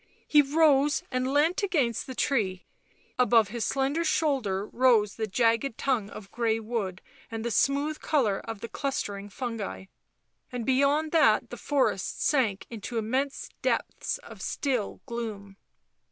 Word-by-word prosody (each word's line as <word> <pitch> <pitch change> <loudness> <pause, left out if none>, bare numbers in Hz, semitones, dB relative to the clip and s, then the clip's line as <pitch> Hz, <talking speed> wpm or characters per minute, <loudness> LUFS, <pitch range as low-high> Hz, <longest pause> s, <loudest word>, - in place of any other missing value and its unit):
He 295 - +6
rose 290 -1 +3
and 255 0 0
leant 305 +7 +2
against 280 - 0
the 260 - -6
tree; 200 -11 0 0.5
above 230 -3 +4
his 235 +1 -3
slender 275 +5 0
shoulder 265 - 0
rose 230 -4 +3
the 220 -1 -2
jagged 230 +3 +1
tongue 240 -7 0
of 200 -1 -10
grey 225 -1 0
wood 215 -5 -4 0.3
and 225 0 -5
the 235 - -1
smooth 285 +7 +1
colour 230 -10 +1
of 225 -3 -7
the - - -4
clustering 205 -7 -3
fungi, 225 -4 -5 0.7
and 245 -3 -4
beyond 280 +4 +2
that 325 -2 +4
the - - -4
forest 265 -9 0
sank 235 -9 +1
into 230 +1 -5
immense 260 +6 -1
depths - - -1
of - - -11
still 255 -7 -2
gloom. 215 -5 -6
240 Hz, 140 wpm, -28 LUFS, 215-280 Hz, 0.7 s, He